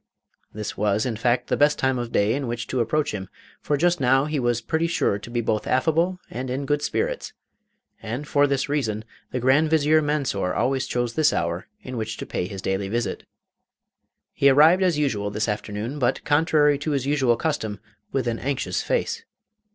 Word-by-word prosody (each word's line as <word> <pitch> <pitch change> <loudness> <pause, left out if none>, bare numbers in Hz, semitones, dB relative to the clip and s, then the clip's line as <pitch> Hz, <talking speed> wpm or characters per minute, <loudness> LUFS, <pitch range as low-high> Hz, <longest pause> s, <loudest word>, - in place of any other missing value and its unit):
This 105 0 -5
was, 105 +2 +1
in 120 -3 -1
fact, 120 +2 +1
the - - 0
best 145 +1 +3
time 130 -1 +1
of 120 -1 -4
day 100 +2 +2
in 135 0 -2
which 120 0 -3
to 130 - -1
approach 145 +5 0
him, 95 -3 -5 0.3
for 145 - 0
just 175 +3 +2
now 135 +1 +3
he 150 -1 -1
was 120 -2 +1
pretty 160 +8 -1
sure 100 -11 0
to 110 - -10
be 120 0 -1
both 110 -1 -1
affable 165 +7 +2
and 125 +3 -4
in 135 +3 -2
good 145 +1 0
spirits, - - -2 0.7
and 120 +7 -5
for 145 0 +3
this 140 -1 0
reason 115 -7 -1 0.2
the 125 - -3
Grand 135 +6 +3
Vizier 155 0 +4
Mansor 140 -12 -1
always 130 0 0
chose 120 -1 -1
this 155 -2 +3
hour 85 +2 -2 0.2
in 130 -1 -6
which 110 0 -3
to - - -5
pay 90 - -3
his 95 -1 -7
daily 95 +1 -1
visit. 115 -2 -3 1.1
He 140 - +4
arrived 155 +7 +6
as 180 -5 +2
usual 105 -9 0
this 105 +2 -2
afternoon, 105 +5 -4
but, 125 0 0
contrary 150 -1 +3
to 150 +1 -2
his 135 -2 -1
usual 135 -5 +2
custom, 110 - -2 0.3
with 135 -3 -1
an 115 -1 -1
anxious 125 -10 -2
face. - - -1
130 Hz, 195 wpm, -24 LUFS, 110-150 Hz, 1.1 s, arrived